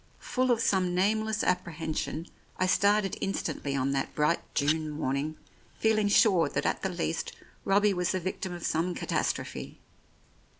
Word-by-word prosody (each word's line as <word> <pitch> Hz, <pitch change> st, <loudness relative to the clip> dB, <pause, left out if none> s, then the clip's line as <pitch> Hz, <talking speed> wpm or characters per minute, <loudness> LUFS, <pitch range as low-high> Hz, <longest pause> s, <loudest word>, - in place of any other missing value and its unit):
Full 255 Hz, -2 st, -1 dB
of 235 Hz, -2 st, +3 dB
some 185 Hz, -4 st, +2 dB
nameless 215 Hz, +3 st, +1 dB
apprehension, 165 Hz, -3 st, -2 dB, 0.3 s
I 185 Hz, -, +2 dB
started 200 Hz, +1 st, +3 dB
in 195 Hz, -, -2 dB
stantly 140 Hz, -5 st, -2 dB
on 130 Hz, +1 st, 0 dB
that 135 Hz, -1 st, -2 dB
bright 150 Hz, +3 st, +2 dB, 0.2 s
June 155 Hz, +2 st, +1 dB
morning, 150 Hz, +1 st, -2 dB, 0.4 s
feeling 215 Hz, -2 st, +2 dB
sure 200 Hz, -4 st, +4 dB
that -, -, -2 dB
at -, -, 0 dB
the 190 Hz, -, -1 dB
least 170 Hz, -2 st, -2 dB, 0.3 s
Robbie 205 Hz, +1 st, +4 dB
was 180 Hz, 0 st, 0 dB
the 185 Hz, -, 0 dB
victim 185 Hz, +1 st, -4 dB
of 175 Hz, -1 st, -6 dB
some 170 Hz, +3 st, 0 dB
catastrophe. -, -, -3 dB
180 Hz, 155 wpm, -29 LUFS, 155-205 Hz, 0.4 s, sure